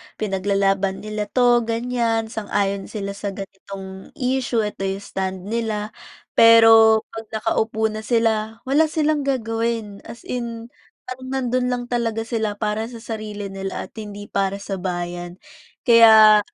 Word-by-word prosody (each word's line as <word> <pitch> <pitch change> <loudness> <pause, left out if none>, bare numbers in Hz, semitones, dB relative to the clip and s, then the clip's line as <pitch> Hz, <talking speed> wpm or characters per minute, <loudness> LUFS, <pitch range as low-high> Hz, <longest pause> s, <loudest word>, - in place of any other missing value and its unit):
pinaglalaban 195 -1 0
nila 215 -1 -4
'to, 245 +1 +4
ganiyan. 230 -1 -1
Sang-ayon 200 -2 -2
sila 200 -2 -5
sa 200 -1 -5
ganitong 195 -1 -9
issue, 250 -3 0
'eto 200 -2 -3
'yong 195 +1 -4
stand 190 -2 -4
nila, 220 -2 -2 0.4
pero 225 -1 +7
'pag 225 0 -8
nakaupo 220 0 0
na 215 - -5
sila, 225 -1 0
wala 295 +4 +3
silang 305 -2 0
gagawin. 225 -4 -2
As 235 - -10
in 235 -1 -5 0.3
parang 255 0 -8
nandun 255 -1 -1
lang 245 -1 -1
talaga 230 -2 -1
sila 220 -3 -2
para 215 +1 -2
sa 235 -2 -10
sarili 210 -3 -6
nila 195 0 -5
at - - -12
hindi 205 -1 -8
para 195 0 0
sa 195 -1 -4
bayan. 175 -1 -4 0.5
Kaya 220 -3 +8
220 Hz, 140 wpm, -22 LUFS, 200-235 Hz, 0.5 s, Kaya